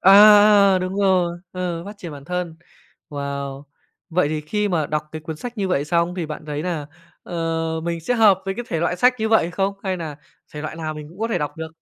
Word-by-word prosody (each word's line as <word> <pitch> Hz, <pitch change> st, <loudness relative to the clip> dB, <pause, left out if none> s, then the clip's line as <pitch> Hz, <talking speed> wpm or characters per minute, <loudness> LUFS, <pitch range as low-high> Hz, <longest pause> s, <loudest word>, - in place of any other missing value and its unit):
à, 190 Hz, -, +6 dB, 0.6 s
à, 185 Hz, -, +3 dB
đúng 185 Hz, +1 st, -3 dB
rồi, 185 Hz, -3 st, +2 dB
ờ, 180 Hz, -2 st, -3 dB
phát 205 Hz, 0 st, -9 dB
triển 170 Hz, -5 st, -7 dB
bản 140 Hz, -1 st, -10 dB
thân. 180 Hz, -1 st, -3 dB, 0.5 s
Wow! 140 Hz, -1 st, -5 dB, 0.5 s
Vậy 165 Hz, -3 st, +2 dB
thì 155 Hz, 0 st, -2 dB
khi 210 Hz, +7 st, -1 dB
mà 160 Hz, -5 st, 0 dB
đọc 150 Hz, 0 st, -2 dB
cái 155 Hz, -, -5 dB
cuốn 160 Hz, 0 st, -6 dB
sách 240 Hz, +6 st, -7 dB
như 195 Hz, -2 st, 0 dB
vậy 145 Hz, -5 st, +1 dB
xong 170 Hz, +2 st, +1 dB
thì 175 Hz, -4 st, -3 dB
bạn 150 Hz, 0 st, -7 dB
thấy 150 Hz, 0 st, -3 dB
nà, 165 Hz, -5 st, -3 dB, 0.4 s
ờ, 165 Hz, -1 st, -2 dB
mình 170 Hz, -1 st, -2 dB
sẽ 245 Hz, +10 st, 0 dB
hợp 215 Hz, -5 st, +5 dB
với 195 Hz, 0 st, -2 dB
cái 240 Hz, -, -5 dB
thể 165 Hz, -, -1 dB
loại 175 Hz, +1 st, 0 dB
sách 250 Hz, +6 st, +4 dB
như 220 Hz, 0 st, 0 dB
vậy 220 Hz, -7 st, +3 dB
không? 195 Hz, +2 st, -1 dB
Hay 190 Hz, -2 st, -1 dB
nà 160 Hz, -4 st, -6 dB, 0.4 s
thể 150 Hz, -, -5 dB
loại 155 Hz, +1 st, -5 dB
nào 155 Hz, -1 st, -4 dB
mình 150 Hz, -1 st, -8 dB
cũng 175 Hz, +5 st, -16 dB
có 225 Hz, +1 st, -1 dB
thể 200 Hz, -, 0 dB
đọc 145 Hz, -1 st, -4 dB
được? 160 Hz, 0 st, -5 dB
170 Hz, 245 wpm, -22 LUFS, 155-190 Hz, 0.6 s, à